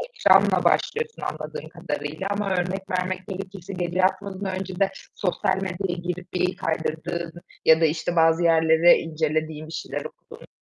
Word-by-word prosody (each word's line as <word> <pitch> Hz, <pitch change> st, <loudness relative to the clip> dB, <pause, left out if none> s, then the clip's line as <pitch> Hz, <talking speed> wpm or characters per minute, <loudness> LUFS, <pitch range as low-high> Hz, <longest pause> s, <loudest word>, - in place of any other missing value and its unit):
ekranla -, -, +5 dB
başlıyorsun 460 Hz, 0 st, +1 dB
anladığım -, -, -5 dB
kadarıyla 190 Hz, -, -4 dB
ama 205 Hz, 0 st, -1 dB
örnek 190 Hz, +1 st, -2 dB
vermek 185 Hz, 0 st, -2 dB
gerekirse 195 Hz, 0 st, -7 dB
gece 175 Hz, 0 st, -2 dB
yatmadan 190 Hz, 0 st, 0 dB
önce 190 Hz, -1 st, -5 dB
de 195 Hz, -1 st, +3 dB, 0.3 s
sosyal 190 Hz, 0 st, 0 dB
medyaya 185 Hz, -2 st, -3 dB
girip 180 Hz, 0 st, -5 dB
bir 180 Hz, 0 st, 0 dB
kaydırdığın 165 Hz, 0 st, -3 dB, 0.3 s
ya 160 Hz, 0 st, +6 dB
da, -, -, +6 dB
işte, 160 Hz, +2 st, -1 dB
bazı 165 Hz, +1 st, +4 dB
yerleri 165 Hz, 0 st, +6 dB
incelediğin 155 Hz, -1 st, -2 dB
bir -, -, -10 dB
şeyler -, -, -4 dB
okuduğun -, -, -13 dB
180 Hz, 145 wpm, -24 LUFS, 165-190 Hz, 0.3 s, ya